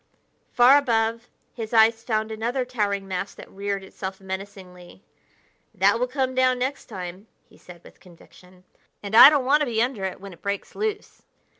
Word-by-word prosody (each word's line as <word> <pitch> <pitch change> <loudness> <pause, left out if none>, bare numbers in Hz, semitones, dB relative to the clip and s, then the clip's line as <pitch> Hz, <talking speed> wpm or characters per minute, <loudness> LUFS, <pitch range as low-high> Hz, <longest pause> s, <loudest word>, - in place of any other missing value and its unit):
Far 255 +4 +6
above, 230 -3 -1 0.2
his 225 -1 -6
eyes 225 0 +4
found 220 -1 -2
another 240 +4 -2
towering 205 -5 -2
mass 190 +1 -5
that - - -12
reared 200 0 -4
itself 190 0 -8
menacingly. 190 -1 -9 0.7
"That 200 +4 +3
will 250 - 0
come 260 0 -2
down 255 0 +2
next 260 +3 -3
time," 185 0 -8 0.2
he - - -22
said 175 -1 -15
with - - -17
conviction, 180 +1 -19 0.4
"and 200 +1 -7
I 240 +4 +11
don't 290 -4 0
want 285 +3 +4
to 300 - -1
be 225 -2 -2
under 240 -4 -1
it 190 - -5
when 195 -1 -10
it 170 - -18
breaks 200 0 -4
loose." 425 -1 -5
220 Hz, 175 wpm, -24 LUFS, 190-250 Hz, 0.7 s, I